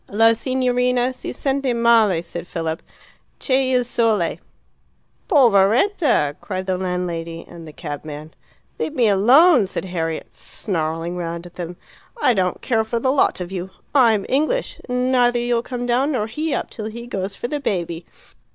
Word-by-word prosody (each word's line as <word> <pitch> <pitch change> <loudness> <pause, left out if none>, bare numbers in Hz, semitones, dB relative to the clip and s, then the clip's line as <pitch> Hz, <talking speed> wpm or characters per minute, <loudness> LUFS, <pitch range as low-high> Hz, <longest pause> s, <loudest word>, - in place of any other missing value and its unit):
"La 225 +2 +5
signorina 250 0 +1
si 255 - -6
sente 270 -2 -1
male," 225 -7 +4
said 170 0 -7
Philip, 165 -2 -3 0.6
"C' 265 - -1
e 260 0 +2
il 250 - +3
sole." 225 -7 +1 0.9
"Poveretta!" 240 - +3
cried 185 -2 -4
the 185 -1 0
landlady 175 -2 -3
and 165 -1 -11
the - - -9
cabman. 150 0 -7 0.5
"Leave 305 - -2
me 240 -5 +3
alone!" 245 - +6
said 190 - -4
Harriet, 165 -3 -4
snarling 165 -2 -3
round 170 0 -4
at 175 - -12
them. 175 0 -7 0.4
"I 255 - +4
don't 185 -4 -1
care 225 -3 +1
for 230 +1 -2
the 260 +2 +1
lot 275 - +2
of 180 0 -5
you. 185 -1 -4 0.2
I'm 230 -7 +4
English, 310 - 0
and 250 +1 0
neither 245 -1 +3
you'll 240 -1 +1
come 245 0 -5
down 255 +5 +1
nor 215 -5 0
he 300 +8 -3
up - - -2
till 215 - -6
he 235 +2 -7
goes 195 -4 -4
for 240 - -4
the 295 +3 -3
baby." 170 - -3
220 Hz, 165 wpm, -21 LUFS, 175-250 Hz, 0.9 s, alone